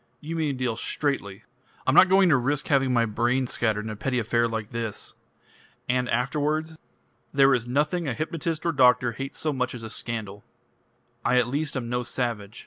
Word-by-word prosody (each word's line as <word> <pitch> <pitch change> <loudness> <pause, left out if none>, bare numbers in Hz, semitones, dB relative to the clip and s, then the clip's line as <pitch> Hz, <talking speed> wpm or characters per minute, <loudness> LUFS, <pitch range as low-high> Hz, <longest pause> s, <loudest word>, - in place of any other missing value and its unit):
"You 160 +4 -6
mean 155 -4 0
to - - -9
deal 125 -3 -1
straightly." 115 -8 -2 0.4
"I'm 130 - +2
not 185 - +7
going 190 0 +5
to 155 - +5
risk 135 +3 -1
having 135 -3 +3
my 120 -2 +3
brains 120 +4 0
scattered 110 -2 0
in 110 - -4
a - - -5
petty 125 +4 -2
affair 115 +1 +1
like 110 -2 -4
this." 115 -3 -4 0.7
"And 125 0 0
afterwards?" 150 +6 -1 0.6
"There 135 -1 +5
is 120 -2 0
nothing 150 +6 0
a 125 - -1
hypnotist 160 +1 -3
or 170 - +2
doctor 125 -4 +4
hates 135 +4 -6
so 155 -2 -1
much 125 -1 -2
as 115 - -8
a 110 - -7
scandal. 105 -4 -5 0.8
I 125 - +3
at 125 -1 +3
least 145 +2 -2
am 120 -2 -4
no 125 +1 -1
savage. 120 -4 -3
125 Hz, 195 wpm, -26 LUFS, 115-145 Hz, 0.8 s, not